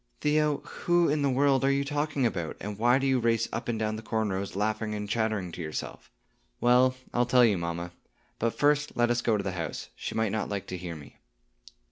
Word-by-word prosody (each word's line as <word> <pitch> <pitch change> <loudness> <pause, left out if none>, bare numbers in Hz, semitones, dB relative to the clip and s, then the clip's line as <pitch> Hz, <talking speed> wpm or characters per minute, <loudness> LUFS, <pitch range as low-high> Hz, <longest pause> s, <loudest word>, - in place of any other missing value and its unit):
"Theo, 150 -1 +2
who 175 0 +1
in 150 +1 +1
the 140 - +2
world 135 0 +3
are 135 - +4
you 140 0 +1
talking 145 -2 -1
about; 90 -8 -2
and 105 0 -6
why 120 +3 +4
do 135 - -1
you 135 -1 +3
race 115 -1 +1
up - - -3
and 120 -2 -1
down 110 0 -1
the - - -7
corn 110 -2 -1
rows, 95 0 -4
laughing 105 +1 -1
and 105 0 -4
chattering 110 -4 -1
to 85 - -7
yourself?" 75 -1 -6 0.5
"Well, 125 +1 +4 0.2
I'll 120 0 +2
tell 125 0 +6
you, 105 -5 +2
mamma; 85 +1 -4 0.5
but 115 0 -1
first 145 0 +2
let 120 0 +3
us 120 0 +1
go 115 -3 +2
to 100 - -3
the 95 - -2
house; 90 -3 -5
she - - -5
might 110 -2 +1
not 110 +1 -2
like 100 -2 -3
to 90 - -4
hear 85 -2 -6
me." 75 -2 -13
115 Hz, 225 wpm, -28 LUFS, 100-135 Hz, 0.5 s, tell